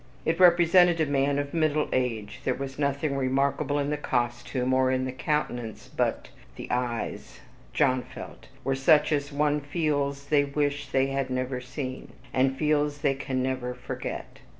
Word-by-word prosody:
It 165 +2 0
represented 175 -1 +6
a 160 - +3
man 140 0 +1
of 145 0 -3
middle 155 -2 +1
age. 115 -5 -1
There 130 - 0
was 135 0 -6
nothing 140 0 0
remarkable 140 +2 +1
in 145 0 0
the 150 - 0
costume, 125 -1 -1
or 130 0 +3
in 130 0 +1
the 130 - -3
countenance, 125 -4 -3
but - - -1 0.3
THE - - -7
EYES, 125 -2 -3 0.3
John 130 -4 +2
felt, - - -11 0.2
were 135 +2 0
such 150 +3 +4
as 145 -1 0
one 150 +1 +1
feels 145 -2 -1
they 145 -2 +4
wish 145 0 -1
they 135 0 +2
had 135 -1 -1
never 130 0 -2
seen, 130 0 -6 0.2
and 130 +1 +2
feels 150 -1 +1
they 140 - +2
can 130 -1 -2
never 130 -1 -2
forget. 125 - -6
140 Hz, 165 wpm, -27 LUFS, 130-150 Hz, 0.3 s, represented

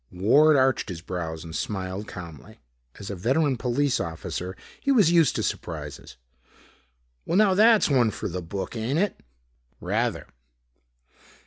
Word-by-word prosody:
Ward 140 +12 +4
arched 130 -4 +2
his 85 -2 -7
brows 85 -3 -5
and 80 -1 -8
smiled 95 +2 -4
calmly. 85 -6 -10 0.4
As 100 0 -7
a - - -4
veteran 135 - +1
police 125 +3 0
officer, 90 +2 -5 0.2
he 280 - +1
was 210 - +5
used 165 -7 +4
to - - -1
surprises. - - -5 1.1
"Well, 170 - 0
now 205 -2 +5
that's 220 +2 +5
one 125 -6 +3
for - - -5
the 90 +1 -4
book, 95 +6 -5
ain't 115 +6 -1
it?" 200 +3 0 0.6
"Rather." - - -1
110 Hz, 140 wpm, -25 LUFS, 90-155 Hz, 1.1 s, was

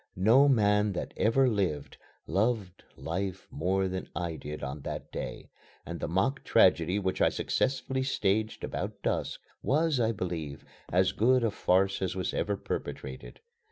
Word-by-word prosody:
No 115 +10 +5
man 105 -4 +3
that - - -4
ever 130 +5 +3
lived, 95 - -1 0.3
loved 100 -3 -1
life 95 +3 -4
more 95 +5 0
than 95 0 -4
I 85 -2 -2
did 75 -1 -7
on 70 +1 -4
that - - -6
day, - - -6 0.3
and - - -5
the - - -2
mock 95 - 0
tragedy 90 -4 +4
which 95 -2 -1
I - - +6
successfully 130 0 -1
staged 110 -4 0
about - - -4
dusk - - -1 0.2
was, 155 0 +2
I 115 -1 +2
believe, 85 -8 -4 0.3
as 90 +1 +3
good 125 +3 +3
a 115 - +2
farce 95 0 +2
as 95 -1 -1
was 95 - -2
ever 100 -1 -1
perpetrated. 65 -7 -6
95 Hz, 155 wpm, -29 LUFS, 90-115 Hz, 0.3 s, I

